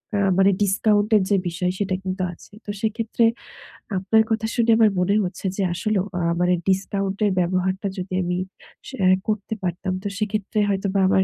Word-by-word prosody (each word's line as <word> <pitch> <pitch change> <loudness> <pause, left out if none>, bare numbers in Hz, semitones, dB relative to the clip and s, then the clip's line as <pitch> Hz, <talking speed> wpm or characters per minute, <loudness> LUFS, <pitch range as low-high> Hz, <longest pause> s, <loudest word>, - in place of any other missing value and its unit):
আ 205 - +1 0.2
মানে 195 +1 +5
ডিসকাউন্ট 205 +2 +2
এর 210 - +5
যে 200 - +4
বিষয় 180 +1 -1
সেটা 190 -2 0
কিন্তু 185 0 -3
আছে। 185 - -17
তো - - -10
সেক্ষেত্রে 225 +1 0 0.7
আপনার 220 +4 +3
কথা 220 0 0
শুনে 230 -1 +3
আমার 220 -2 +6
মনে 195 +3 +2
হচ্ছে 185 +2 -6
যে 200 - -2
আসলেও 200 +1 0
আ - - -1 0.2
মানে 180 0 +3
ডিসকাউন্টের 195 +1 0
ব্যবহারটা 185 +2 0
যদি 185 0 -5
আমি 180 0 -1 0.5
সে 265 - -7
অ্যা 185 - +5 0.2
করতে 215 0 -2
পারতাম, 185 +1 -2
তো 205 - -2
সেক্ষেত্রে 215 0 -2
হয়তোবা 195 0 0
আমার 190 -1 +4
195 Hz, 175 wpm, -23 LUFS, 185-215 Hz, 0.7 s, আমার